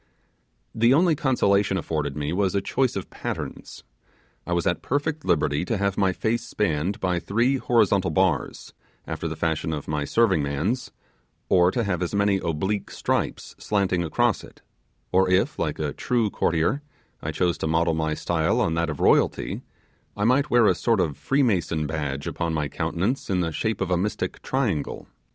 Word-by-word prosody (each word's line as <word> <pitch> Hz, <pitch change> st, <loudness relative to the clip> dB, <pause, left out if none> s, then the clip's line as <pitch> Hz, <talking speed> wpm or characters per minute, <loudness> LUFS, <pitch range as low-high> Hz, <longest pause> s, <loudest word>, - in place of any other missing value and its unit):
The 115 Hz, +4 st, +4 dB
only 170 Hz, +2 st, +4 dB
consolation 100 Hz, -8 st, +2 dB
afforded 75 Hz, -5 st, -2 dB
me 75 Hz, +2 st, -2 dB
was 95 Hz, 0 st, +1 dB
a -, -, +3 dB
choice 130 Hz, +4 st, 0 dB
of 95 Hz, -, -5 dB
patterns: -, -, -6 dB, 0.6 s
I -, -, -4 dB
was 85 Hz, -1 st, 0 dB
at 85 Hz, -, 0 dB
perfect 145 Hz, +2 st, -1 dB
liberty 75 Hz, -1 st, +1 dB
to 115 Hz, -, -1 dB
have 100 Hz, 0 st, 0 dB
my 95 Hz, -1 st, +2 dB
face 115 Hz, +5 st, -1 dB
spanned 95 Hz, -1 st, -1 dB
by 90 Hz, -2 st, 0 dB
three 120 Hz, +9 st, +1 dB
horizontal 100 Hz, -7 st, +2 dB
bars, 85 Hz, -4 st, 0 dB, 0.3 s
after -, -, -4 dB
the -, -, -4 dB
fashion 80 Hz, -1 st, -1 dB
of 75 Hz, -2 st, -5 dB
my 75 Hz, -1 st, -1 dB
serving 100 Hz, -7 st, +3 dB
man's; 75 Hz, -, -1 dB, 0.6 s
or 90 Hz, -1 st, +5 dB
to 120 Hz, +5 st, -1 dB
have 95 Hz, -4 st, -1 dB
as 90 Hz, +3 st, -2 dB
many 100 Hz, -1 st, +3 dB
oblique 95 Hz, +6 st, -2 dB
stripes -, -, -2 dB
slanting 95 Hz, -4 st, 0 dB
across 80 Hz, -, +1 dB
it; -, -, -15 dB, 0.5 s
or 95 Hz, 0 st, +3 dB
if, 95 Hz, +1 st, +1 dB
like -, -, -1 dB
a -, -, -2 dB
true 115 Hz, -4 st, 0 dB
courtier, 85 Hz, -, +1 dB, 0.4 s
I 75 Hz, -, -4 dB
chose 85 Hz, +3 st, 0 dB
to -, -, -1 dB
model 80 Hz, +1 st, +2 dB
my 80 Hz, -1 st, -1 dB
style 80 Hz, -1 st, 0 dB
on 80 Hz, -, +1 dB
that 85 Hz, 0 st, 0 dB
of 75 Hz, -, -5 dB
royalty, -, -, +2 dB, 0.6 s
I 105 Hz, -, -1 dB
might 130 Hz, +6 st, +3 dB
wear 120 Hz, -3 st, +5 dB
a 100 Hz, -, +5 dB
sort 115 Hz, +4 st, +1 dB
of 80 Hz, -6 st, 0 dB
freemason 95 Hz, -, +1 dB
badge 75 Hz, -3 st, -3 dB
upon 85 Hz, -1 st, -2 dB
my 75 Hz, -2 st, -1 dB
countenance 100 Hz, -, -2 dB
in 90 Hz, -2 st, +1 dB
the 85 Hz, -2 st, -1 dB
shape 110 Hz, +4 st, -2 dB
of 95 Hz, -1 st, -1 dB
a 90 Hz, -, +3 dB
mystic 100 Hz, +4 st, -2 dB
triangle. 110 Hz, -, -2 dB
95 Hz, 180 wpm, -24 LUFS, 80-110 Hz, 0.6 s, or